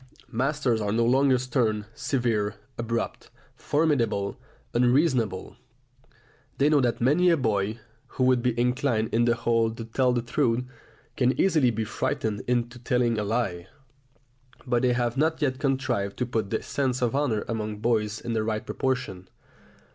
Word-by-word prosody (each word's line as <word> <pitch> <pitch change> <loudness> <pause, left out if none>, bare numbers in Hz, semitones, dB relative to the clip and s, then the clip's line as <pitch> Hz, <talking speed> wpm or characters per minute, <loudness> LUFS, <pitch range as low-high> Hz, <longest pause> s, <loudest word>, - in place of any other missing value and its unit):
Masters 130 -2 0
are 105 -1 -1
no 115 +2 +2
longer 130 +2 +4
stern, 120 -4 0
severe, 115 -5 -1 0.2
abrupt, 115 0 -3 0.3
formidable, 135 -10 0 0.4
unreasonable. 120 - +1 1.0
They 140 +2 +3
know 150 -2 +4
that 120 -2 0
many 155 +9 +4
a 170 - +4
boy, 110 -3 0 0.3
who 130 - -2
would 130 -1 +4
be 120 -1 0
inclined 125 -2 0
on 120 +1 +3
the 120 -1 +3
whole 115 -1 +1
to 115 0 -7
tell 125 +3 +1
the 120 -1 0
truth, 120 0 +1 0.5
can 130 -3 +1
easily 155 -9 +4
be 110 -1 -2
frightened 105 0 -2
into 120 0 -1
telling 120 -2 +1
a - - -1
lie; 100 -5 -2 1.0
but 120 -2 +1
they 125 -1 +3
have 120 +1 -1
not 160 +3 +1
yet 130 -3 0
contrived 130 -8 -1
to 125 - 0
put 110 -4 -2
the 110 - -2
sense 130 -3 -1
of 120 - +1
honour 130 -7 0
among 110 -2 -3
boys 110 -1 0
in 120 -1 -4
the 110 - +1
right 110 -1 -2
proportion. 95 -8 -3
120 Hz, 155 wpm, -26 LUFS, 110-130 Hz, 1.0 s, longer